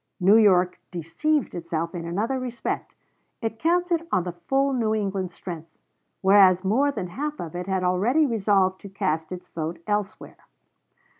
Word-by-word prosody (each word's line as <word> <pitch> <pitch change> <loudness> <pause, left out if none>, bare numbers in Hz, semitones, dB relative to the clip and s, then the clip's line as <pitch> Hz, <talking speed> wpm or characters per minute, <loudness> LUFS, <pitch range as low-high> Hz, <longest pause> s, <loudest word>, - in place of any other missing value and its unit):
New 195 +3 +5
York 185 -5 +4
deceived 215 - -1
itself 165 -1 -3
in 170 -2 -5
another 220 +10 -1
respect: 245 -1 -4 0.4
it 225 -1 -4
counted 340 +1 +1
on 180 - +2
the 180 - -4
full 270 +11 0
New 220 -4 +1
England 195 -3 -2
strength, 165 -3 -9 0.4
whereas 190 -2 +6
more 265 +9 +2
than 180 -10 -5
half 295 +9 -4
of 165 -1 -6
it 180 +1 -4
had 190 -1 0
already 210 +12 +2
resolved 195 -6 +1
to 200 - -9
cast 160 -4 -2
its 180 -1 -7
vote 165 +1 -4
elsewhere. 205 -1 -4
195 Hz, 155 wpm, -25 LUFS, 175-240 Hz, 0.4 s, whereas